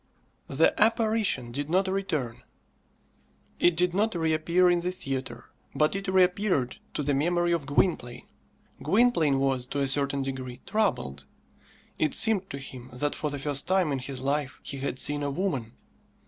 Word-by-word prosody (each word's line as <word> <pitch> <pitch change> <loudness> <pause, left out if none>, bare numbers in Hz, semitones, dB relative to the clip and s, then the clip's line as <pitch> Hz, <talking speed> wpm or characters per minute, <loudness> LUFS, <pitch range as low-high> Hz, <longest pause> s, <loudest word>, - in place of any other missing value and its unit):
The 145 +4 +3
"apparition" 220 - +2
did 145 +4 -4
not 190 +3 +2
return. 160 -11 -2 1.2
It 175 -1 +4
did 175 +1 +2
not 210 +2 +1
reappear 165 +2 +2
in 175 -1 +3
the 180 +1 -2
theatre, 135 -7 -5 0.2
but 155 +3 +2
it 195 +1 -4
reappeared 185 -7 +2 0.2
to 150 - -1
the 145 +1 +1
memory 175 +5 +1
of 165 -5 -1
Gwynplaine. 145 -5 0 0.6
Gwynplaine 200 - +3
was, 135 -2 0
to 140 - -3
a 140 - +1
certain 140 0 0
degree, 130 -2 -5
troubled. 70 - -1 0.7
It 155 -2 +1
seemed 205 -4 +2
to 140 - -5
him 130 -2 -9
that 145 +4 -1
for 150 - -3
the 145 - -4
first 140 0 -1
time 185 -4 +2
in 135 - -1
his 130 0 -6
life 140 0 -1
he 140 - -4
had 135 -1 -3
seen 145 +2 +1
a 145 - -1
woman. 140 - -2
150 Hz, 160 wpm, -27 LUFS, 135-185 Hz, 1.2 s, It